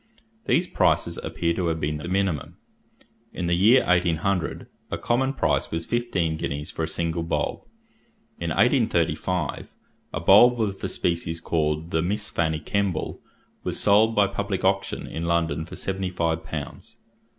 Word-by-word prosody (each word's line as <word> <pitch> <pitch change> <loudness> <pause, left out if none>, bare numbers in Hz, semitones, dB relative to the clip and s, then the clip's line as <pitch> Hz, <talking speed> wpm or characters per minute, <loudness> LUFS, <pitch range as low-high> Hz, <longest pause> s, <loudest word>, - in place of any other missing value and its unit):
These 175 - +3
prices - - +1
appear 85 0 -1
to 90 0 -1
have 80 -1 -1
been 75 0 -1
the 75 - -7
minimum. 95 -5 -1 0.8
In 90 - -3
the 85 - +1
year 110 +9 +5
1800, 90 0 +1 0.2
a - - -2
common 130 +3 +1
price 135 - 0
was 80 0 -3
fifteen 95 -10 -1
guineas 75 -1 -4
for - - -5
a - - -6
single 85 +1 -2
bulb. 80 0 -2 0.8
In 85 - -2
1835, 90 - +1 0.4
a - - -3
bulb 110 +8 +6
of 100 -3 -1
the - - -3
species 85 -1 -1
called 80 0 -1
the 80 - +1
Miss 105 +5 -2
Fanny 80 -2 0
Kemble 100 -1 -2 0.4
was - - -2
sold 110 +2 +4
by 105 - +5
public 100 - -2
auction - - 0
in 80 - -5
London 85 -1 0
for - - -9
seventy 95 -1 -3
five 85 -2 -1
pounds. - - -7
85 Hz, 155 wpm, -25 LUFS, 80-100 Hz, 0.8 s, bulb